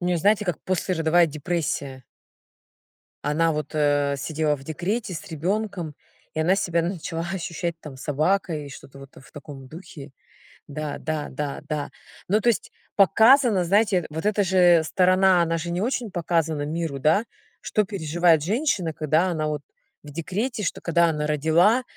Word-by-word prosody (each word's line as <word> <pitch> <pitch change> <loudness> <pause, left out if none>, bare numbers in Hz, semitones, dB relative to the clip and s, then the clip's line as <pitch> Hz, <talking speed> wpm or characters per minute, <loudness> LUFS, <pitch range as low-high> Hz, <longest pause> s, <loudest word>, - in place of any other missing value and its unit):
у 175 - -4
неё 180 -1 +1
знаете, 205 +4 +2
как 175 - -1
послеродовая 175 -2 +2
депрессия. 145 -4 -3 1.2
Она 160 +2 +2
вот, 150 -1 -4
э, 145 -1 +2
сидела 150 +1 -1
в 135 - -14
декрете 185 +7 -3
с - - -7
ребёнком, 180 0 -3 0.4
и 155 - -1
она 180 +4 +3
себя 170 -4 0
начала 165 -1 -4
ощущать 170 -1 -3
там 140 -4 -10
собакой 155 +2 -1
и - - -9
что-то 140 0 -12
вот 135 0 -12
в 135 - -16
таком 140 -2 -10
духе. 155 -2 -11 0.5
Да, 150 0 -5
да, 155 -2 -3
да, 140 +1 -4
да. 150 -2 -3 0.4
Ну, 210 +3 +3
то 240 - +1
есть, 230 - 0 0.2
показано, 220 0 +5
знаете, 195 -1 +2
вот 160 +5 -4
эта 210 -1 +2
же 175 -3 +5
сторона, 185 +1 +4
она 165 0 0
же 170 +1 -4
не 175 +2 -2
очень 240 -1 -2
показана 165 -3 -1
миру, 155 -1 -3
да, 160 - +3 0.4
что 210 - 0
переживает 170 -4 +2
женщина, 200 - 0
когда 155 +4 +1
она 155 -3 -1
вот 150 -1 -3 0.4
в 150 - -11
декрете, 205 - -3
что, 170 - -2
когда 170 0 +2
она 150 -1 -2
родила, 160 - +3
165 Hz, 160 wpm, -24 LUFS, 150-190 Hz, 1.2 s, показано